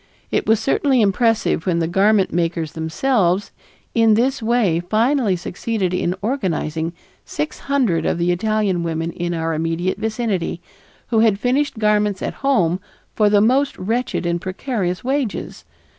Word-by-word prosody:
It -, -, 0 dB
was 220 Hz, -1 st, +4 dB
certainly 270 Hz, +2 st, +2 dB
impressive 215 Hz, -3 st, +1 dB
when 175 Hz, -2 st, +2 dB
the 165 Hz, -1 st, 0 dB
garment 195 Hz, +3 st, +2 dB
makers 165 Hz, -2 st, -1 dB
themselves 180 Hz, +4 st, 0 dB, 0.4 s
in 225 Hz, -2 st, +4 dB
this 255 Hz, +4 st, +1 dB
way 220 Hz, -7 st, +2 dB
finally 220 Hz, +3 st, +1 dB
succeeded 185 Hz, +2 st, -3 dB
in 180 Hz, 0 st, 0 dB
organizing 170 Hz, -, -2 dB, 0.3 s
six 150 Hz, +1 st, -4 dB
hundred 255 Hz, -12 st, +1 dB
of -, -, 0 dB
the 175 Hz, +1 st, +1 dB
Italian 205 Hz, -1 st, 0 dB
women 165 Hz, 0 st, -2 dB
in 175 Hz, -1 st, -3 dB
our 165 Hz, 0 st, -1 dB
immediate 165 Hz, +4 st, -1 dB
vicinity, 220 Hz, -6 st, -2 dB, 0.5 s
who 225 Hz, -, +2 dB
had 220 Hz, -3 st, +4 dB
finished 255 Hz, +5 st, 0 dB
garments 210 Hz, -2 st, +1 dB
at -, -, -2 dB
home 185 Hz, -11 st, +2 dB, 0.3 s
for 210 Hz, -1 st, +3 dB
the 205 Hz, -1 st, +4 dB
most 265 Hz, +6 st, +2 dB
wretched 225 Hz, 0 st, -2 dB
and 170 Hz, 0 st, -1 dB
precarious 185 Hz, -2 st, -3 dB
wages. 265 Hz, -4 st, -3 dB
200 Hz, 145 wpm, -20 LUFS, 175-230 Hz, 0.5 s, was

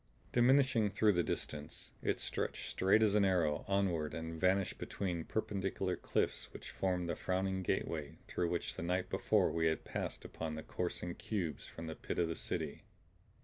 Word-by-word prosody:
Diminishing 125 Hz, -3 st, +5 dB
through 105 Hz, +2 st, +4 dB
the 85 Hz, -, +3 dB
distance, 75 Hz, -2 st, -4 dB
it -, -, 0 dB
stretched -, -, -2 dB
straight 100 Hz, +4 st, +4 dB
as 105 Hz, -2 st, +4 dB
an 105 Hz, -1 st, +5 dB
arrow 85 Hz, -6 st, +2 dB
onward 95 Hz, -6 st, +1 dB
and 80 Hz, 0 st, -5 dB
vanished 95 Hz, +1 st, +2 dB
between 90 Hz, -4 st, -2 dB
perpendicular 95 Hz, -3 st, -1 dB
cliffs -, -, -1 dB
which -, -, -8 dB
formed 90 Hz, -2 st, 0 dB
the 85 Hz, -, -1 dB
frowning 95 Hz, 0 st, 0 dB
gateway 80 Hz, -4 st, -1 dB
through 85 Hz, -, 0 dB
which 85 Hz, -1 st, -1 dB
the -, -, -6 dB
night 90 Hz, +2 st, 0 dB
before -, -, +3 dB
we 80 Hz, 0 st, +2 dB
had 80 Hz, -, 0 dB
passed -, -, -4 dB
upon 80 Hz, -1 st, -4 dB
the 80 Hz, -, -5 dB
coursing 90 Hz, 0 st, -3 dB
cubes 85 Hz, -10 st, -3 dB
from 85 Hz, -, -8 dB
the 80 Hz, -, -4 dB
pit -, -, -4 dB
of 85 Hz, -, +3 dB
the 80 Hz, -, -2 dB
city. -, -, -3 dB
90 Hz, 175 wpm, -36 LUFS, 80-100 Hz, -, Diminishing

